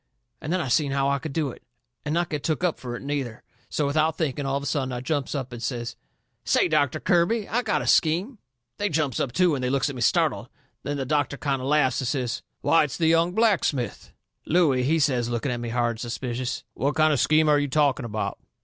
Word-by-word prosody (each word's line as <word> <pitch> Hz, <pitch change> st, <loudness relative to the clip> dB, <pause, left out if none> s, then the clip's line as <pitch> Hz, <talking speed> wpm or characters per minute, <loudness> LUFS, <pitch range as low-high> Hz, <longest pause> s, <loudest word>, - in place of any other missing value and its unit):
And 155 Hz, -, -4 dB
then 185 Hz, -, +1 dB
I 160 Hz, -, -2 dB
seen 135 Hz, +3 st, +1 dB
how 135 Hz, 0 st, +1 dB
I 140 Hz, 0 st, +1 dB
could 155 Hz, +1 st, -6 dB
do 145 Hz, -2 st, -1 dB
it, -, -, -14 dB, 0.4 s
and 150 Hz, -, -3 dB
not 175 Hz, 0 st, 0 dB
get 150 Hz, -2 st, -2 dB
took 160 Hz, +1 st, -1 dB
up 175 Hz, -3 st, 0 dB
fur 120 Hz, -1 st, -5 dB
it, -, -, -8 dB
neither. 140 Hz, -5 st, -3 dB, 0.3 s
So, 150 Hz, -, 0 dB
without 155 Hz, +2 st, +1 dB
thinking, 145 Hz, -3 st, -2 dB
all 135 Hz, 0 st, 0 dB
of 140 Hz, -, -5 dB
a -, -, -5 dB
sudden 135 Hz, -3 st, -1 dB
I 125 Hz, -, -3 dB
jumps 140 Hz, +2 st, -2 dB
up 130 Hz, -3 st, -4 dB
and 120 Hz, -, -7 dB
says: 120 Hz, -1 st, -3 dB, 0.5 s
"Say, -, -, +3 dB
Doctor 140 Hz, -3 st, +1 dB
Kirby, 195 Hz, +5 st, +2 dB
I 240 Hz, +3 st, 0 dB
got 220 Hz, -4 st, 0 dB
a -, -, -5 dB
scheme!" 185 Hz, -, +2 dB, 0.4 s
They 205 Hz, 0 st, 0 dB
jumps 145 Hz, -5 st, 0 dB
up 130 Hz, -, -1 dB
too, 180 Hz, +3 st, +3 dB
and 130 Hz, -3 st, -2 dB
they 125 Hz, -, 0 dB
looks 140 Hz, +1 st, +1 dB
at -, -, -9 dB
me 125 Hz, -, -6 dB
startled. -, -, +1 dB, 0.3 s
Then 145 Hz, +1 st, -3 dB
the 135 Hz, -, -2 dB
doctor 145 Hz, 0 st, 0 dB
kind 135 Hz, -2 st, -1 dB
o' 130 Hz, -, -4 dB
laughs 140 Hz, -3 st, +2 dB
and 130 Hz, -, -2 dB
says: 125 Hz, -3 st, -2 dB, 0.2 s
"Why, 165 Hz, -2 st, +4 dB
it's 140 Hz, -, -6 dB
the 165 Hz, -, +1 dB
young 165 Hz, +2 st, +3 dB
blacksmith!" 185 Hz, -, 0 dB, 0.4 s
Looey, 150 Hz, -6 st, +3 dB
he 150 Hz, +6 st, +2 dB
says, 130 Hz, -6 st, +1 dB
looking 120 Hz, +2 st, -1 dB
at 120 Hz, -, -2 dB
me 120 Hz, -1 st, -4 dB
hard 120 Hz, 0 st, +1 dB
and 115 Hz, -, -8 dB
suspicious: 120 Hz, +1 st, -4 dB
"What 140 Hz, +2 st, -1 dB
kind 155 Hz, -1 st, +4 dB
of 140 Hz, -, +1 dB
a -, -, +3 dB
scheme 155 Hz, 0 st, +4 dB
are 150 Hz, -1 st, +5 dB
you 145 Hz, -, 0 dB
talking 140 Hz, -1 st, +2 dB
about?" 110 Hz, -1 st, -3 dB
140 Hz, 250 wpm, -25 LUFS, 125-155 Hz, 0.5 s, are